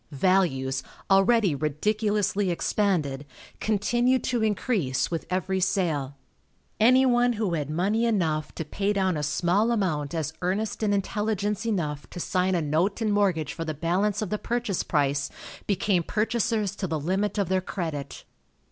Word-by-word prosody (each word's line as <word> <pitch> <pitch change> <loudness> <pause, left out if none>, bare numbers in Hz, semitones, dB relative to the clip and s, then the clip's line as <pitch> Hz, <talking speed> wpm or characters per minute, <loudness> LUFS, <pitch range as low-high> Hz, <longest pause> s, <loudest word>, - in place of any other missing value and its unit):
Values, 140 -5 +1 0.3
already 195 -1 +4
ridiculously 205 +7 0
expanded, 170 -6 0 0.4
continued 240 +4 +1
to 245 -3 0
increase 205 - 0
with 165 - -3
every 185 +1 -1
sale. 155 -7 0 0.6
Anyone 245 +1 +5
who 210 -5 -1
had 150 -3 -2
money 200 +9 +1
enough 165 -9 0
to 160 - -4
pay 200 +6 -1
down 190 -3 +1
a 150 - -2
small 175 +9 +1
amount 165 -9 -1
as 160 -1 -2
earnest 195 +6 -1
and 215 -2 +1
intelligence 210 +1 -1
enough 150 -9 -2
to - - -8
sign 185 0 +1
a 170 - 0
note 165 +8 0
and 215 -2 +1
mortgage 180 -8 +1
for 165 - -4
the 155 -1 -4
balance 190 +7 0
of 200 - -5
the 210 - -1
purchase 235 -5 -1
price 140 -2 0 0.4
became 195 -2 +1
purchasers 215 +1 0
to 190 - -2
the 160 -2 -2
limit 190 +8 -1
of 200 -3 +1
their 190 +1 +1
credit. 160 -7 -5
190 Hz, 150 wpm, -26 LUFS, 160-210 Hz, 0.6 s, Anyone